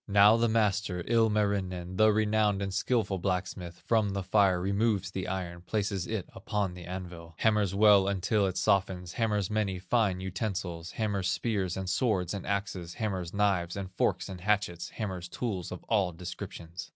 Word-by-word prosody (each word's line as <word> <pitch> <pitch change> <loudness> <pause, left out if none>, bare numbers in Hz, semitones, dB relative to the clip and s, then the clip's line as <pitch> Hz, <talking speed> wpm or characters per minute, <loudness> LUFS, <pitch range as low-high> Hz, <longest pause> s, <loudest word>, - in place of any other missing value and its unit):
"Now 100 +1 +7
the 115 0 +2
master, 100 -5 +1
Ilmarinen, 100 -5 +1
The 110 +1 +6
renowned 105 -1 +2
and 100 -1 -3
skilful 105 -4 0
blacksmith, 90 -2 -3
From 110 -4 +2
the 100 -1 -2
fire 95 -1 +3
removes 100 +1 0
the 95 -1 -4
iron, 90 -2 -4
Places 100 -1 -2
it 110 -5 -3
upon 100 -1 -2
the 90 -1 -9
anvil, 85 -3 -7
Hammers 105 -4 +2
well 100 -2 +6
until 100 +1 +1
it 95 - -3
softens, 90 -2 +1
Hammers 105 -4 0
many 105 -3 0
fine 100 -1 +1
utensils, 95 -3 -4
Hammers 100 -4 -1
spears, 95 -3 -1
and 95 -1 -4
swords, 90 -1 +1
and 100 - -5
axes, 95 -4 -3
Hammers 95 -7 -2
knives, 95 -4 +1
and 95 -1 -5
forks, - - 0
and 95 -2 -8
hatchets, 95 -4 0
Hammers 95 -5 -5
tools 95 -3 -3
of 90 - -7
all 100 -5 +1
descriptions. 85 0 -7
95 Hz, 165 wpm, -30 LUFS, 90-105 Hz, -, Now